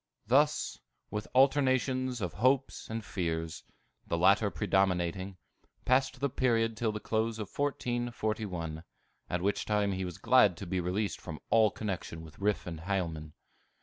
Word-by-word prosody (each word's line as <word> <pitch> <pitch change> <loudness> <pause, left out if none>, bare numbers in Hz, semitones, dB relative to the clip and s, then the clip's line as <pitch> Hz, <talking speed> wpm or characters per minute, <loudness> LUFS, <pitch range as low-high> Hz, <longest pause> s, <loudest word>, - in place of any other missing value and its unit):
Thus, 145 +7 +2 0.3
with 105 0 -3
alternations 130 -2 +3
of 90 -4 -2
hopes 130 +2 +2
and 110 0 -4
fears, 80 -3 -3 0.4
the 85 - 0
latter 100 +4 +4
predominating, 95 -2 0 0.5
passed 130 0 +2
the 140 - +1
period 115 -4 +1
till 110 0 0
the 105 - -4
close 110 +1 -1
of 105 -3 -7
1441, 110 - -2 0.5
at 90 0 -1
which 100 +1 +1
time 105 -1 +1
he 95 0 -2
was 90 -1 -5
glad 105 -4 +5
to 100 - -6
be 95 +1 -1
released 90 +1 -1
from 80 -3 -7
all 110 -2 +6
connection 95 -6 -5
with 80 -1 -13
Riffe 105 +1 0
and 85 -2 -6
Hielman. 80 -4 -3
105 Hz, 150 wpm, -31 LUFS, 90-120 Hz, 0.5 s, all